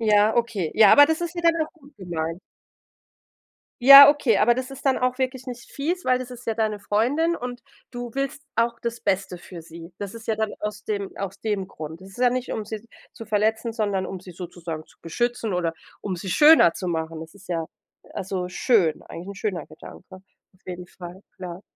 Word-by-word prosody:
Ja, 215 -1 +4
okay. 225 -9 -1
Ja, 215 -2 +7
aber 290 0 +8
das 320 +1 -1
ist 345 0 -4
wieder 340 -1 +4
noch 315 -2 -2
gut 290 -5 -21
gemeint. 170 -2 -4 1.4
Ja, 275 +2 +12
okay, 285 -7 +3
aber 240 +2 +4
das 255 +2 -4
ist 270 +1 -9
dann 265 - +3
auch 255 +1 0
wirklich 260 0 -2
nicht 240 -1 -8
fies, 340 +6 -3
weil 255 0 +3
das 255 0 -7
ist 245 0 -11
ja 225 - 0
deine 215 -2 -1
Freundin 260 +12 +1
und 245 -3 -6 0.3
du 245 -1 -6
willst 275 +1 -2
auch 235 +1 +1
das 235 0 -4
Beste 190 -1 -1
für 175 -1 -11
sie. 165 +1 -12
Das 200 0 -6
ist 230 0 -11
ja 220 - +1
dann 220 -1 -1
aus 210 -1 -5
dem 200 -2 -3
aus 195 0 -6
dem 205 -3 -2
Grund. 160 -1 -9
Es 190 - -13
ist 195 - -15
ja 250 -1 +4
nicht, 255 +1 -3
um 215 - -3
sie 215 +1 -7 0.3
zu 225 - -10
verletzen, 220 +2 0
sondern 205 -4 -1
um 190 - -7
sie 185 - -12
sozusagen 170 -2 -7
zu - - -24
beschützen 235 +5 -2
oder 175 -2 0 0.3
um 195 - -3
sie 180 +2 -7
schöner 295 - +7
zu 185 - -6
machen. 160 -1 -3
Das 160 0 -11
ist 195 -2 -17
ja 165 -2 -2 0.5
also 185 -2 -4
schön, 180 - +2
eigentlich 170 +3 -9
'n 200 - -6
schöner 190 -4 -3
Gedanke, 160 +4 -13
auf 185 0 -25
jeden 180 -1 -7
Fall, 175 +1 -11 0.2
klar. 180 0 -8
210 Hz, 210 wpm, -24 LUFS, 180-245 Hz, 1.4 s, Ja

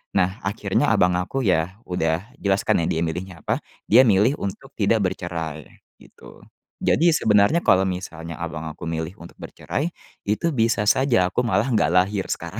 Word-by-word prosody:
Nah, 95 +2 +1
akhirnya 100 +1 0
abang 90 0 +3
aku, 90 +9 -2
ya, 90 +2 0
udah 85 +2 -1
jelas, 100 0 +1
kan, - - +4
ya, - - -1
dia 80 - -1
milihnya 90 +1 -5
apa. - - 0 0.3
Dia 130 - +7
milih 105 +7 +3
untuk 115 +8 -6
tidak 110 +1 +2
bercerai, 80 -5 -5 0.4
gitu. - - -16 0.4
Jadi 170 0 +3
sebenarnya 105 +10 +3
kalau 95 0 +4
misalnya 85 -3 -6
abang 80 -1 -5
aku 75 - -11
milih 80 +3 -4
untuk 85 - -14
bercerai, 155 - -4 0.4
itu 110 +11 0
bisa 115 -3 +1
saja 125 -9 +3
aku 125 - +1
malah 105 +3 +1
nggak 105 -6 +2
lahir 95 +1 +2
sekarang. - - -4
95 Hz, 165 wpm, -23 LUFS, 85-110 Hz, 0.4 s, Dia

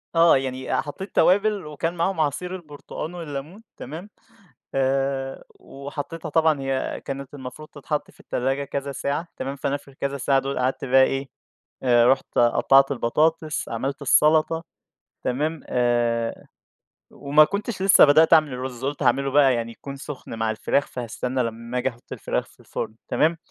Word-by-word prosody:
آه، 165 -3 +6
يعني 130 -1 -3
آآ، - - +2
حطيت 185 +7 -8
توابل 205 0 +3
وكان 150 +3 -3
معاهم 175 +1 0
عصير 180 +5 -1
البرتقان 155 0 -8
والليمون، 165 +4 -7
تمام، 160 +9 -8 0.7
آآ، 135 0 -1
وحطيتها 145 +4 -7
طبعًا 160 -1 +2
هي 135 -1 -2
كانت 140 0 -6
المفروض 140 +3 -9
تتحط 150 0 -4
في - - -24
التلاجة 135 +3 -1
كذا 140 0 -4
ساعة 140 +5 -3
تمام، 135 +1 -4
فأنا 140 0 -1
في 145 - -16
الكذا 140 0 -4
ساعة 135 +1 +2
دول 135 0 -2
قعدت 130 +2 -1
بقى 130 0 +5
إيه، 135 +1 0 0.6
آآ، 120 -2 +5
رُحت 135 +1 +1
قطّعت 135 +3 +5
البطاطس، 155 +5 0
عملت 135 +5 -3
السلطة، 155 +3 +3 0.6
تمام 150 +5 -1
آآ، 120 -2 0 0.6
وما 145 +2 +4
كنتش 200 +3 -4
لسه 195 0 +7
بدأت 155 +3 +5
أعمل 155 -4 +6
الرُز 125 0 -5
قُلت 140 +1 -2
هاعمله 135 +3 +2
بقى 135 -2 +5
يعني 115 -1 -2
يكون 140 +4 -9
سخن 140 -3 -8
مع 110 0 0
الفراخ، 110 +5 0
فهاستنى 125 +1 -3
لما 115 +1 -4
آجي 125 +1 +1
أحط 120 -2 -13
الفراخ - - -2
في - - -23
الفرن، 110 - -5
تمام. 165 +2 +2
140 Hz, 155 wpm, -24 LUFS, 130-155 Hz, 0.7 s, لسه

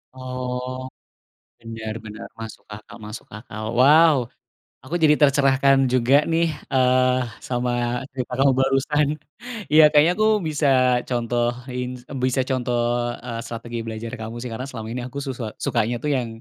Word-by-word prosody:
Oh, 130 0 -5 0.7
benar 110 -1 -6
benar 110 0 -8
masuk 110 -1 -8
akal 105 +2 -10
masuk 105 +1 -8
akal. 105 0 -8
Wow, 150 +5 +6 0.7
aku 145 +6 -5
jadi 150 -1 +6
tercerahkan 135 -1 +4
juga 130 +1 +3
nih 165 +1 +2 0.2
eee, 130 0 +3 0.2
sama 125 0 -2 0.4
cerita 125 -1 -4
kamu 135 0 +4
barusan. 135 +2 +2 0.7
Ya 160 - +9
kayaknya 155 +3 +5
aku 215 0 +3 0.2
bisa 150 -1 0 0.4
contohin 120 +1 -2 0.4
bisa 130 +1 +1
contoh 125 -2 0 0.5
eee, 115 -2 -4
strategi 115 0 -6
belajar 115 +1 -6
kamu 110 +1 -6
sih, 125 - -5
karena 130 +4 -5
selama 115 -4 -7
ini 125 - -4
aku 135 - -9
susa 130 -3 -4 0.2
sukanya 120 -3 0
tuh 150 - 0
yang 125 -2 -2
125 Hz, 140 wpm, -22 LUFS, 115-135 Hz, 0.7 s, Ya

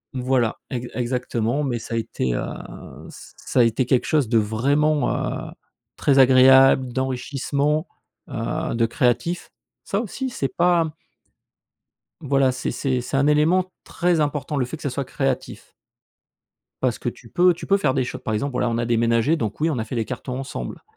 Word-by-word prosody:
Voilà, 125 -3 0
ex 125 -1 -4
exactement, 125 +1 -1
mais 120 -4 -1
ça 115 - -5
a - - 0
été, 65 - -2
heu, - - -2 0.7
ç - - -13
ça 125 - 0
a - - +6
été 115 +2 +1
quelque 125 -1 +2
chose 140 -4 +1
de 115 - +3
vraiment, 140 +8 +1 0.4
heu, - - -11 0.5
très 140 -2 +3
agréable, 130 -1 +6
d'enrichissement, 140 +4 -1 0.4
heu, - - -3
de 115 0 +2
créatif. 125 +7 0 0.4
Ça, 200 - -1
aussi 260 +4 -4
c'est 135 - -3
pas 170 -3 +2 1.3
voilà, 135 -2 +2
c'est 125 0 -3
c'est 130 -3 -1
c'est 125 +2 -3
un 140 +2 +3
élément 170 +5 +3
très 175 -1 0
important, 145 0 -2
le 125 - +1
fait 160 +6 -7
que - - -13
ce 140 - -1
soit 135 +1 -3
créatif. 135 -1 -3 1.1
Parce - - +1
que - - -2
tu - - -14
peux 180 0 +4
tu 165 - -9
peux 200 0 +4
faire 135 -8 +1
des 130 - +1
cho 125 - -5
par 110 - -4
exemple, 140 +6 -1
voilà, 125 -1 0
on 115 - -1
a 120 - -1
déménagé 115 +5 +2
donc 110 -3 -3
oui, 160 - +2
on 145 - -1
a - - -1
fait 125 - -6
les 115 -2 -1
cartons 125 0 -5
ensemble. 135 - -6
130 Hz, 185 wpm, -22 LUFS, 120-150 Hz, 1.3 s, a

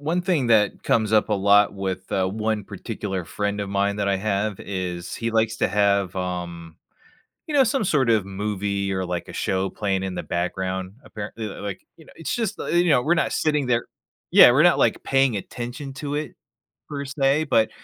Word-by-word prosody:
one 165 +5 0
thing 170 -9 0
that 105 -3 +3
comes 110 -2 +1
up 110 0 +4
a - - 0
lot 100 +1 +4
with, 95 -1 -4
uh, 95 -1 +1
one 110 +1 -2
particular 100 -2 -5
friend 105 +4 -2
of 100 - -3
mine 100 +1 0
that 100 -1 -1
I 100 - +2
have 100 0 -1
is 90 -3 -4
he 115 0 -2
likes 110 0 +1
to - - +2
have, 100 -2 +2
um, 85 -3 -5 0.7
you 310 - -6
know 270 - +6
some 270 -2 0
sort 135 - +2
of 110 -4 +2
movie 100 0 -2
or 95 -1 -2
like, 90 -1 -4
a - - -9
show 95 0 -1
playing 95 -2 -2
in 95 -1 -4
the - - -4
background. 95 +2 -3
Apparently 110 +1 -6
like, 100 -1 -7
you 160 - -16
know - - -17
it's 165 - -4
just, 225 -4 -2
you 175 0 +1
know, 140 -5 +5
we're 155 +7 +2
not 170 - 0
sitting 150 -3 +1
there 120 -1 +1 0.4
Yeah, - - +9
we're - - +4
not, - - +5
like, - - +2
paying 135 -3 +2
attention 120 +7 -6
to 145 +1 -4
it 150 +1 -4 0.5
per 140 -2 -4
se, 140 +1 +1
but 115 -7 +3
105 Hz, 200 wpm, -23 LUFS, 95-135 Hz, 0.7 s, Yeah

